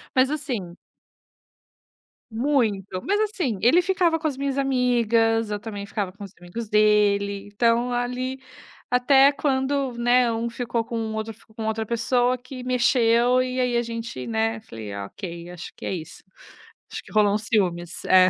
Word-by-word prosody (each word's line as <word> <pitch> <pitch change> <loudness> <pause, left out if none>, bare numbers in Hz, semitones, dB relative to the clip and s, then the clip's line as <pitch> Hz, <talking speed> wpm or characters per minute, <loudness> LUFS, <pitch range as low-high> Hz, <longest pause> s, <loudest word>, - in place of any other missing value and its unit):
Mas 260 +1 +4
assim 240 - -4 1.6
Muito, 220 -7 0
mas 410 +1 +1
assim, 365 - -1
ele 295 +10 +5
ficava 355 -2 +2
com 320 - -10
as 290 -4 0
minhas 275 0 -2
amigas, 235 -4 +2
eu 205 - -2
também 205 -2 -6
ficava 200 -3 -3
com 205 - -11
os 195 - -9
amigos 190 +6 -7
dele, 205 -1 +2
então 235 +3 +2
ali, 250 +2 -2 0.5
até 270 +3 +5
quando, 275 -1 0
né, 240 0 +3
um 230 +1 -2
ficou 235 -1 -2
com 230 - -4
o 220 -1 -3
outro, 220 +1 -4
ficou 220 0 -23
com 220 0 -4
outra 220 0 -1
pessoa 245 +2 +1
que 255 +1 -9
mexeu, 250 0 +3
e 255 0 -3
aí 250 -1 +1
a 235 - +3
gente, 230 - -5
né, 225 0 -1
falei: 110 - -8
"Ok, 170 - -7
acho 180 0 -9
que - - -9
é - - -2
isso. 170 0 -8 0.7
Acho - - -6
que - - -16
rolou 210 -2 +4
um - - 0
ciúmes". 180 -6 -1
É. 185 0 +6
230 Hz, 165 wpm, -24 LUFS, 205-255 Hz, 1.6 s, É